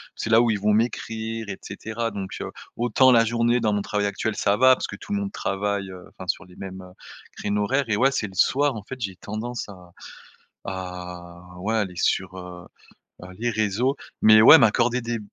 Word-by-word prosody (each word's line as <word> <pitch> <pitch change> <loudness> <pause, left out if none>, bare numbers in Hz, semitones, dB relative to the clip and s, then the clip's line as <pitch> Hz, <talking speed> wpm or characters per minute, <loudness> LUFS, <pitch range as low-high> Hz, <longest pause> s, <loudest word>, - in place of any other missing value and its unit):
c'est - - -4
là 115 0 +6
où 120 -1 +2
ils 105 - -1
vont 105 +1 +2
m'écrire 115 0 -2
et 100 -2 -5
cetera 110 +3 -5
donc 100 -2 -6
heu, - - -5 0.2
autant 120 +2 +4
la 115 -1 +6
journée 115 +1 +1
dans 110 -2 +1
mon 105 -1 0
travail 105 0 -1
actuel 105 +2 -2
ça 100 +1 +1
va 130 +2 +6
parce - - -4
que - - -8
tout 205 - -7
le 205 - 0
monde 200 0 -4
travaille, 100 0 -2
heu, 90 -1 -11
enfin 95 - -11
sur 95 - -1
les 90 -1 -18
mêmes, 95 -1 -8
heu, 90 - -13 0.5
créneaux 105 0 -1
horaires, 135 +6 +1
et 105 - +2
ouais 135 +5 +3
c'est 105 - -2
le 95 - -13
soir 140 +7 +2
en 105 - -7
fait 130 +4 -9
j'ai 95 -5 -4
tendance 110 +3 -6
à 90 -3 -13 0.7
à 90 -2 -7 0.2
ouais 105 +5 -2
aller 95 -5 -1
sur, 95 +2 0
heu 90 -1 -10 0.6
heu, 90 - -9
les 120 +1 0
réseaux, 110 +5 0 0.3
mais 110 0 +7
ouais 110 - +10
m'accorder 115 +3 +3
des 115 0 -3
105 Hz, 215 wpm, -24 LUFS, 95-115 Hz, 0.7 s, ouais